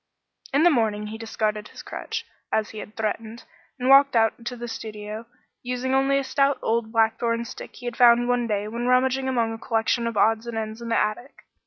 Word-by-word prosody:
In 285 +3 +3
the 350 - +6
morning 215 -5 +1
he 220 +1 -7
discarded 215 -2 -2
his - - -11
crutch, 445 +1 -5 0.3
as 220 0 0
he 215 - -8
had 210 - -9
threatened, 220 +1 -3 0.3
and 250 -1 -2
walked 275 0 +7
out 225 +1 +2
to 250 - -3
the 240 0 -6
studio, 215 0 -7 0.3
using 250 +1 -2
only 270 +1 +3
a 275 - 0
stout 275 +1 +2
old 225 0 0
blackthorn 230 +1 +1
stick - - -9
he 245 - -11
had 240 -1 -3
found 240 0 +6
one 245 -1 +1
day 210 -1 -1
when 235 +3 -3
rummaging 260 +1 +2
among 230 -3 0
a 225 - -7
collection 230 +1 0
of 230 -2 -3
odds 225 +2 +2
and 235 -1 -4
ends 220 +1 -4
in 235 - -6
the 230 - +2
attic. 215 +6 -2
230 Hz, 210 wpm, -24 LUFS, 220-250 Hz, 0.3 s, walked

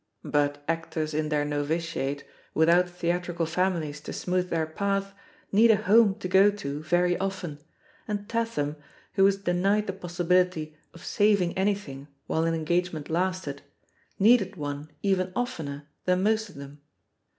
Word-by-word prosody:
But 145 0 0
actors 160 -1 -2
in 155 0 -1
their 150 -1 +1
novitiate, 145 -1 -2 0.3
without 170 +3 +4
theatrical 175 -1 -2
families 160 -3 -1
to - - -7
smooth 180 0 -1
their 165 -1 0
path, 195 +4 -2 0.4
need 220 +4 +6
a 220 - +7
home 210 0 +4
to 200 -3 -5
go 190 +2 +6
to 150 -8 -4
very 175 +3 +2
often, 190 -6 -4 0.5
and 205 -1 -3
Tatham, 225 -11 -1 0.4
who 195 - +3
was 195 0 +5
denied 195 +3 +1
the 190 - -3
possi 175 -2 -5
bility 180 -3 +2 0.2
of 170 - -12
saving 200 -4 +2
anything 190 -9 -2 0.2
while 160 +1 0
an 165 0 +1
engagement 165 -1 -1
lasted, 175 -4 -1 0.6
needed 205 -2 +4
one 145 -1 -5
even 190 -2 +1
oftener 150 - -4 0.2
than 180 0 +2
most 220 +1 +1
of - - -15
them. 140 +1 -10
175 Hz, 150 wpm, -27 LUFS, 155-195 Hz, 0.6 s, a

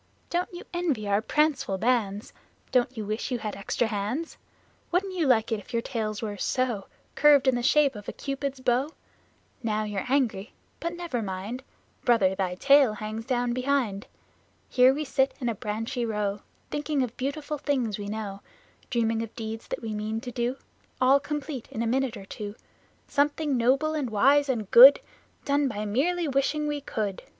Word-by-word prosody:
Don't 350 +1 -1
you 350 0 -8
envy 305 -12 -1
our 200 +1 +2
pranceful 275 -4 +1
bands? 215 -2 0 0.4
Don't 250 -1 +1
you 215 - -3
wish 215 +3 -3
you 250 - -1
had 215 -3 -5
extra 200 +4 -1
hands? 220 +9 -3 0.6
Wouldn't 375 +2 0
you 335 -5 0
like 230 -3 +3
if 220 +2 -4
your 230 0 0
tails 215 -3 -3
were 205 -2 -4
so 240 -2 -1 0.3
Curved 285 -2 +5
in 260 - +5
the 245 - 0
shape 285 +2 +4
of 205 -2 -8
a - - -3
Cupid's 275 -1 -4
bow? 255 +3 +1 0.7
Now 215 -2 0
you're 210 +1 -3
angry, 235 -6 0 0.3
but 335 +1 -3
never 340 -9 -3
mind, 200 +5 -5 0.4
Brother, 215 -6 +4
thy 185 -2 -2
tail 275 +2 +5
hangs 215 +1 -5
down 245 -2 0
behind! 250 -6 0 0.6
Here 255 0 +6
we 300 +3 -2
sit 270 0 +1
in 250 - -2
a - - 0
branchy 220 +4 -3
row, 210 -3 -2 0.3
Thinking 295 -2 0
of 245 -2 -5
beautiful 290 +3 -3
things 250 -8 -1
we 205 - -5
know; 205 -2 -5 0.5
Dreaming 225 -2 +1
of 225 -1 -7
deeds 225 -1 -6
that - - -5
we 220 -1 -3
mean 215 +1 -2
to 250 0 -6
do, 245 +1 -1 0.4
All 265 +2 +5
complete, 290 -3 -5
in 225 - -3
a - - -1
minute 260 +1 0
or 195 - -10
two 205 +1 -7 0.5
Something 290 0 +1
noble 270 +6 +2
and 290 -5 -2
wise 275 +7 +4
and 220 -6 -2
good, 265 +4 +10 0.5
Done 285 0 +2
by 215 -4 -3
merely 325 +11 0
wishing 280 +2 0
we 295 -1 -2
could. 210 -7 -3
245 Hz, 175 wpm, -27 LUFS, 215-280 Hz, 0.7 s, good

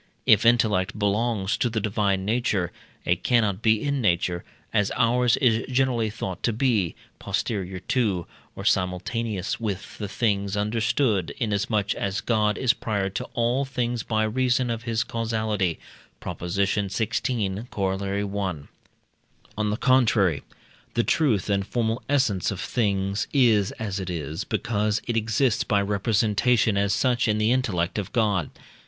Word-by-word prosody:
If 110 +2 +5
intellect 110 -4 +2
belongs 105 0 0
to 120 - +1
the 110 -1 -1
divine 100 -2 0
nature, 110 -5 0 0.3
it 90 +1 0
cannot 110 -5 +2
be 110 -1 +3
in 140 -2 0
nature, 85 -3 +1 0.3
as 105 -3 +2
ours 120 0 +3
is 115 -4 +2
generally 125 -4 +1
thought 95 -3 -5
to 120 - +1
be, 110 -7 +1 0.2
posterior 95 -4 -2
to, 100 -8 0 0.3
or - - -7
simultaneous 95 +2 -1
with 100 -4 -5
the 105 - -3
things 100 -2 0
understood, 105 - 0
inasmuch 105 -3 0
as 100 +1 -2
God 105 -3 +1
is 125 -2 +3
prior 100 -5 -2
to 95 - -4
all 120 +3 +1
things 125 -3 -2
by 110 -1 0
reason 125 +2 +1
of 115 -1 -3
his 115 0 +1
causality 110 -7 -1 0.4
(Prop. - - -6
xvi., 100 +3 -1
Coroll. 100 +1 -2 0.2
i.). - - -19 0.9
On 110 -1 0
the 105 - -1
contrary, 115 - +3 0.5
the 120 - +3
truth 120 - +1
and 100 -1 +1
formal 115 0 -1
essence 130 -10 +2
of 100 - -4
things 100 -3 -1
is 115 -8 +4
as 100 -3 -4
it 95 -1 -4
is, 80 -3 -4
because 105 -1 0
it 120 - -2
exists 115 +2 +1
by 105 - +1
representation 105 +2 +2
as 100 0 +1
such 125 +3 +2
in 105 -1 +2
the 110 +2 +2
intellect 105 -8 0
of 100 -1 -5
God. 105 -8 +1
105 Hz, 145 wpm, -25 LUFS, 100-115 Hz, 0.9 s, If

